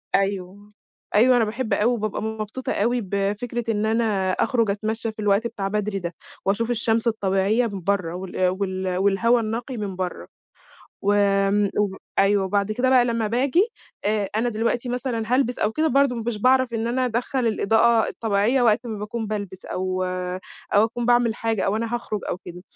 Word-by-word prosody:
أيوه، 195 +1 -2 0.4
أيوه 245 +4 +6
أنا 225 - +3
باحب 225 0 -2
أوي 210 +4 +3
وبابقى 215 -3 -2
مبسوطة 220 +3 -4
أوي 235 +3 +1
بفكرة 210 +4 -2
إن 210 0 0
أنا 220 -4 +1
أخرج 230 +1 +1
اتمشى 220 +2 -2
في 215 - -17
الوقت 205 +2 +2
بتاع 205 -4 -4
بدري 210 0 -1
ده 170 -2 -5 0.3
واشوف 220 +5 +1
الشمس 230 0 +1
الطبيعية 210 +2 +1
من 200 -3 -6
برّا 185 -3 0
وال 185 0 -1
وال 185 -1 -2
والهوا 200 +5 +3
النقي 230 +3 -3
من 200 -3 -4
برّا، 180 -1 -4 0.8
وآمم 200 0 +2
و 200 -2 0 0.2
أيوه 195 0 +4
وبعد 200 +2 0
كده 255 +3 +1
بقى 255 -2 +6
لمّا 230 -2 0
باجي 270 - +2 0.4
آآ 205 -1 +1
أنا 230 +3 +1
دلوقتي 235 +2 -1
مثلًا 245 -2 -2
هالبس 250 -2 +1
أو 210 +1 +1
كده 315 +4 +1
برضه 275 -1 +3
مش 230 -1 -3
باعرف 260 -1 +4
إن 225 0 -1
أنا 255 +2 0
ادخّل 245 +1 -1
الإضاءة 225 +1 +3
الطبيعية 225 +4 +1
وقت 230 +1 +3
ما 220 -3 -4
باكون 220 +2 -4
بالبس 200 -3 -5
أو 185 0 -2 0.7
أو 205 +2 +6
اكون 235 +1 -3
باعمل 240 -2 +3
حاجة 225 -2 -1
أو 200 - +1
أنا 230 +1 -2
هاخرج 215 -3 -3
أو - - -1
كده، 180 0 -9
215 Hz, 175 wpm, -23 LUFS, 200-235 Hz, 0.8 s, أيوه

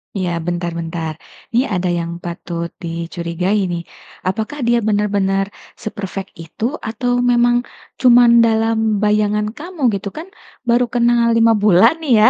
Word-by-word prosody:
Iya 185 -3 -1
bentar 175 0 -2
bentar, 165 -1 -4 0.4
ini 245 +3 +2
ada 180 -3 -1
yang 170 0 -4
patut 170 0 -5
dicurigai 170 +4 -2
nih, 170 -1 -3 0.4
apakah 220 +8 -2
dia 240 0 +4
benar-benar 205 -2 +1 0.4
se-perfect 195 -3 -5
itu 165 +6 -9 0.2
atau 245 +2 -1
memang 240 0 +3 0.4
cuman 240 -2 +6
dalam 225 0 +3 0.3
bayangan 210 0 +1
kamu, 330 +6 -10 0.2
gitu? 200 - -7
Kan 325 +3 -6 0.4
baru 240 +1 +4
kenal 235 -1 +3
5 230 0 +5
bulan 215 - +5
nih 305 -6 +1
ya, 220 - +8
210 Hz, 135 wpm, -18 LUFS, 180-240 Hz, 0.4 s, ya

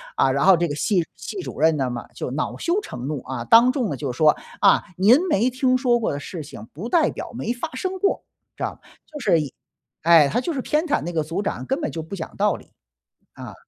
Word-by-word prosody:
啊， 135 - +3
然 140 +1 +1
后 190 -1 +7
这 170 +1 +1
个 145 - -4
系 180 +3 +1
系 405 - -7
主 - - -7
任 160 0 +4
呢 135 -2 0
嘛， 120 -1 -6
就 - - -4
恼 145 +4 -3
羞 355 +5 0
成 125 - -7
怒， 145 -4 -3
啊， 130 -3 -5
当 235 - +6
众 250 -7 -1
呢， - - -2
就 135 -1 -3
说： 150 +4 +4 0.2
“啊， - - +5
您 205 +6 +6
没 240 0 +2
听 255 0 +2
说 245 -2 +2
过 225 - -1
的 140 - -3
事 160 +2 -7
情 115 -7 -11
不 195 - -6
代 325 0 +3
表 - - -7
没 240 -1 -2
发 245 +7 -5
生 370 +7 -3
过。” 395 - 0 0.3
知 - - -5
道， - - -4 0.2
就 300 - -9
是 245 - +3 0.7
哎， 165 -2 +6
他 245 - 0
就 340 - -2
是 270 -5 -3
偏 305 +3 0
袒 295 - +1
那 175 - -4
个 160 - +1
组 165 +6 -3
长， 200 - -3
根 270 +3 0
本 300 - -3
就 165 - -4
不 160 +5 -7
讲 170 - -7
道 - - +2
理， - - -14 0.6
啊。 - - -10
195 Hz, 265 characters per minute, -23 LUFS, -, 0.7 s, 后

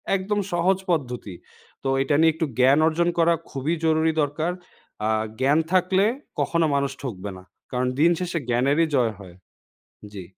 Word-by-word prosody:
একদম 200 +2 -1
সহজ 180 +2 +2
পদ্ধতি। 125 - -2 0.5
তো - - -2
এইটা 135 +2 +1
নিয়ে 160 0 +5
একটু 160 - -1
জ্ঞান 135 +3 +5
অর্জন 170 +2 +1
করা 170 0 +4 0.2
খুবই 140 +4 -2
জরুরি 160 0 +3
দরকার। 155 +4 -2 0.6
আ - - +1 0.3
জ্ঞান 140 +4 +3
থাকলে 185 +1 +3 0.3
কখনো 170 -1 +1
মানুষ 140 -1 0
ঠকবে 105 -6 -5
না। 90 - -13 0.3
কারণ 125 0 0
দিন 165 +3 +5
শেষে 175 -2 -2
জ্ঞানেরই 140 +7 +2
জয় 120 -4 +2
হয়। 90 -3 -12 0.8
জি। 95 -2 -7
155 Hz, 155 wpm, -24 LUFS, 130-170 Hz, 0.8 s, নিয়ে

